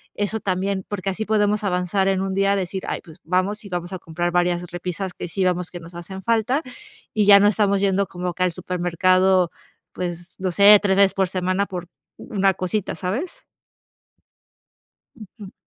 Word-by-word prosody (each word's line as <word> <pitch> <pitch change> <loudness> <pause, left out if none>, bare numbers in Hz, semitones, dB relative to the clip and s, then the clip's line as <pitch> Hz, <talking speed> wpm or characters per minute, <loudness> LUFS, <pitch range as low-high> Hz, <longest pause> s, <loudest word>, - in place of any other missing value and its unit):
Eso 205 +2 -1
también, 190 0 -1
porque 200 -2 -3
así 220 +3 -4
podemos 210 -1 +1
avanzar, 190 0 0
en 190 -1 +1
un 195 0 -2
día 195 0 +2
decir: 190 0 -3
"Ay, - - -3
pues 160 +1 -16
vamos 185 +5 -1
y - - -9
vamos 175 0 -4
a 185 - -5
comprar 175 +1 -3
varias 175 0 +1
repisas 180 +1 -4
que - - -6
sí 190 +2 -1
veamos 180 -1 0
que 175 - -7
nos 170 +1 -12
hacen 190 +3 -8
falta", 230 - +1 0.5
y 210 -1 +2
ya 200 0 +9
no 205 - +5
estamos 200 -2 +2
yendo 200 0 +1
como 180 0 -4
que 185 +2 -1
al 180 - +2
supermercado, 185 +1 +2 0.4
pues 175 0 -6
no 185 0 -1
sé, 200 +3 +8
tres 195 -2 +2
veces 200 -1 +5
por 190 -2 +1
semana 185 +2 -1
por 180 -2 -6 0.3
una 195 -2 +1
cosita, 185 +2 -2
¿sabes? 220 - -4 1.8
Ujú. 205 -1 -11
190 Hz, 180 wpm, -22 LUFS, 180-200 Hz, 1.8 s, ya